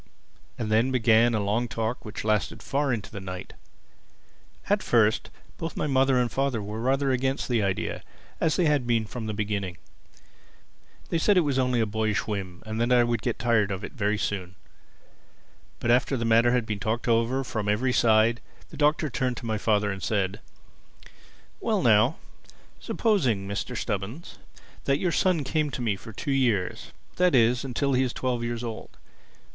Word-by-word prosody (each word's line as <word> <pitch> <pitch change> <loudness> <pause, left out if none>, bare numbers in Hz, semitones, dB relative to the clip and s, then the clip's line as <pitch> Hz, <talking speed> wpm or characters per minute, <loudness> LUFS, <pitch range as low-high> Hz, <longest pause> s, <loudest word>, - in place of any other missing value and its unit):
And 110 -2 -3
then 115 +4 +3
began 115 -2 +4
a - - +1
long 105 +4 0
talk 115 +2 -3
which 105 -1 -6
lasted 105 -2 -1
far 140 0 0
into 110 -4 -3
the 100 - -6
night. 90 -1 -7 1.1
At - - +2
first - - +2 0.3
both 165 -1 -5
my - - 0
mother 135 -2 +3
and 120 -1 0
father 135 -3 0
were 105 +2 -5
rather 135 +2 +1
against 130 +1 0
the 120 -3 +1
idea—as 100 - -3
they 180 - +2
had 145 -5 +2
been 115 -2 +2
from 110 +1 -6
the 110 - -2
beginning. 100 -4 -3 1.3
They 165 - 0
said 205 +4 +3
it - - +6
was 140 -4 0
only 125 -2 +1
a 115 - +2
boyish 110 -1 -1
whim, 95 -4 -5
and 110 +1 -3
that 120 +1 +1
I 125 -1 +6
would 120 -2 -1
get 120 -2 -2
tired 115 -5 +2
of 95 0 -4
it - - -6
very 105 -3 0
soon. 95 -3 -3 1.2
But 120 - +1
after 130 +2 +2
the 115 - -2
matter 115 +1 +4
had 125 -2 +1
been 105 -2 -3
talked 110 +5 -2
over 120 +3 +2
from 110 -4 -3
every 125 +5 +1
side, 115 0 +3 0.3
the - - -10
Doctor 150 +1 +2
turned 125 -2 -2
to - - -7
my 110 -2 -1
father 105 -1 +1
and 95 0 -6
said, 100 0 -1 1.2
"Well 215 -6 0
now, 115 +5 +4 0.6
supposing, 130 - 0
Mr. 100 +4 -4
Stubbins, 110 - -5 0.5
that 140 0 +2
your 175 +2 0
son 170 -1 +2
came 150 +2 0
to 130 - -5
me 110 -4 +1
for 110 - -11
two 140 - -4
years—that 135 - 0
is, 120 +1 +3
until 135 +1 -1
he 130 - +3
is 130 -2 0
twelve 125 -2 -2
years 120 0 -3
old. 115 -2 -7
120 Hz, 180 wpm, -26 LUFS, 105-130 Hz, 1.3 s, it